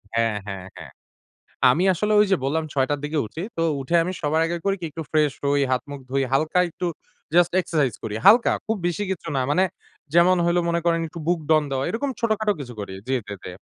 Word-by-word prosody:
হ্যাঁ, 115 -2 +1
হ্যাঁ, 95 -2 -6
হ্যাঁ। - - -10 0.8
আমি 170 +7 +1
আসলে 210 +5 -1
ঐযে 195 -2 +4
বল্লাম 155 +4 0
৬ 135 -2 +2
টার 145 -1 0
দিকে 150 +1 -2
উঠি। 110 +11 -7 0.2
তো - - 0 0.2
উঠে 150 +6 -1
আমি 180 - -2
সবার 155 +2 +1
আগে 170 +1 -2
করি 195 0 +2
কি - - -3
একটু 165 - -6
ফ্রেশ 150 -2 +3
হই। 140 0 +2
হাত 125 -1 +1
মুখ 140 - -6
ধুই 135 0 +1
হালকা 155 +5 +2
একটু 180 - -5 0.5
জাস্ট 175 0 +5
এক্সারসাইজ 145 -10 0
করি। 110 -1 -4
হালকা 230 +4 +7
খুব 220 -1 -1
বেশি 190 +4 -2
কিছু 170 -2 -5
না। 130 - +1
মানে 185 +5 +3 0.5
যেমন 175 +2 +5
হইলো 175 +1 +2
মনে 170 0 +1
করেন 165 -1 +2
একটু 170 +1 -9
বুকডাউন 155 -3 +2
দেওয়া। 135 0 -1
এরকম 270 +5 -2
ছোটখাটো 220 -2 +1
কিছু 125 -3 -7
করি। 100 -2 -6
জি, 135 - 0 0.2
জি, - - -4
জি। 90 - -7
160 Hz, 215 wpm, -23 LUFS, 135-180 Hz, 0.8 s, হালকা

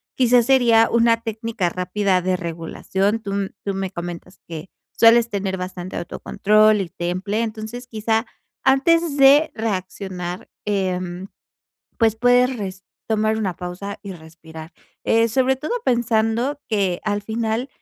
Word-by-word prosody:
Quizás 245 -2 +4
sería 235 -3 +5
una 230 0 +3
técnica 225 -4 -2
rápida 185 +1 0
de 185 +1 0
regulación, 185 +5 -2
tú 200 -1 -3 0.2
tú 200 - -1
me 195 0 -3
comentas 175 +1 -7
que 165 +1 -8 0.2
sueles 230 0 +5
tener 195 -2 -2
bastante 180 0 -6
autocontrol 215 +4 +2
y 180 - -5
temple, 185 +6 -2
entonces 225 +2 -5
quizá, 225 0 -1 0.4
antes 290 +4 +3
de 280 +3 +6
reaccionar, 185 -4 -4 0.2
em, 185 -2 -2 0.7
pues 225 -2 +3
puedes 245 +2 +4
resp 190 -2 -6 0.2
tomar 220 0 +1
una 190 -5 -2
pausa 180 +4 -6
y 200 -2 -7
respirar, 160 0 -12 0.3
eh, 230 0 +3
sobre 260 +3 +2
todo 300 - -6
pensando 235 +2 +1
que 195 -5 0
al 205 -1 -1
final, 225 +3 -2
210 Hz, 130 wpm, -21 LUFS, 185-230 Hz, 0.7 s, de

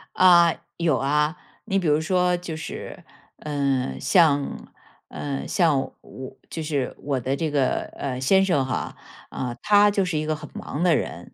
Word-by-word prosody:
啊， 175 -2 +6 0.2
有 165 -5 +1
啊。 150 +4 +1 0.3
你 195 -3 0
比 180 - -2
如 150 0 +3
说 180 +2 +1
就 175 -2 -6
是， 160 - -8 0.4
嗯， 140 -3 -1
像， 150 -6 +2 0.4
嗯， 140 -2 -5
像 160 -6 +2 0.2
我 130 0 -10
就 160 - -5
是 145 -4 -2
我 140 -2 -2
的 130 +3 -1
这 155 +1 -2
个， 140 -3 +1 0.2
呃， 130 -3 -3
先 190 +9 +4
生 145 -8 +1
哈， 130 - -3 0.3
呃， 125 -2 -4
他 205 0 +5
就 200 -1 +1
是 175 -4 -2
一 155 - -1
个 155 0 -1
很 150 - -10
忙 150 - -6
的 175 -3 +4
人。 85 - -5
155 Hz, 180 characters per minute, -24 LUFS, 140-175 Hz, 0.4 s, 啊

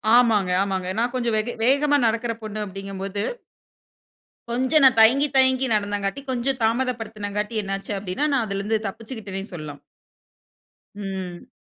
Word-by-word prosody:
ஆமாங்க 220 -6 +4
ஆமாங்க. 190 -2 -2
நான் 240 +2 0
கொஞ்சம் 235 -3 0
வெக 225 +3 -1
வேகமா 290 +3 +4
நடக்கிற 230 +1 -1
பொண்ணு 215 0 -5
அப்டிங்கம்போது 195 +1 -4 1.3
கொஞ்சம் 260 +4 +3
நான் 265 - +7
தயங்கி, 260 +6 +6
தயங்கி 260 0 +4
நடந்தங்காட்டி, 205 +3 -1
கொஞ்சம் 260 +1 0
தாமதப்படுத்தினங்காட்டி 220 -3 -2
என்ன 195 0 -2
ஆச்சு 195 - -8
அப்படினா, 195 +8 -2
நான் 245 -4 +2
அதில 200 -2 -3
இருந்து 220 +2 +1
தப்பிச்சுகிட்டேன்னு 210 -2 -7
சொல்லலாம். 150 -3 -8 1.2
ம். 190 -3 -6
220 Hz, 130 wpm, -23 LUFS, 195-250 Hz, 1.3 s, நான்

